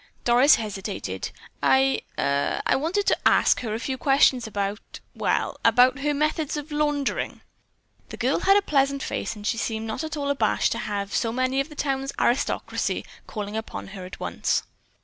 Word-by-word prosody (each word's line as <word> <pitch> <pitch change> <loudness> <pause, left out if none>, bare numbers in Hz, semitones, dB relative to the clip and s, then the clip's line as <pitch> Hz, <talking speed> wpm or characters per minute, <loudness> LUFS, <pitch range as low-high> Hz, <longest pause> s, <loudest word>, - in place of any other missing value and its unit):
Doris 245 +5 +6
hesitated. 210 -4 -4 0.3
"I—er—wanted 270 - +1
to - - +3
ask - - +4
her 220 -3 -3
a - - -3
few 260 +1 -3
questions 270 -3 +4
about—well, 205 0 -3
about 250 +4 +5
her 295 +1 0
methods 305 0 0
of 295 +1 -7
laundering." 295 -2 -1 0.7
The - - -8
girl - - +1
had 390 +1 +5
a 405 - +2
pleasant 275 -4 +1
face - - -3
and 210 -1 -10
she 230 +1 0
seemed 220 -1 -2
not 220 +7 -4
at 315 -1 -4
all 280 -1 0
abashed 280 - +1
to - - -2
have 200 -1 -3
so 230 - +1
many 255 +2 0
of 275 +3 -1
the 300 - -11
town's 270 -1 -2
"aristocracy" 245 +3 0 0.2
calling 210 -1 -5
upon 220 -3 -5
her 195 -2 -8
at 180 - -9
once. - - -1
265 Hz, 165 wpm, -25 LUFS, 220-285 Hz, 0.7 s, Doris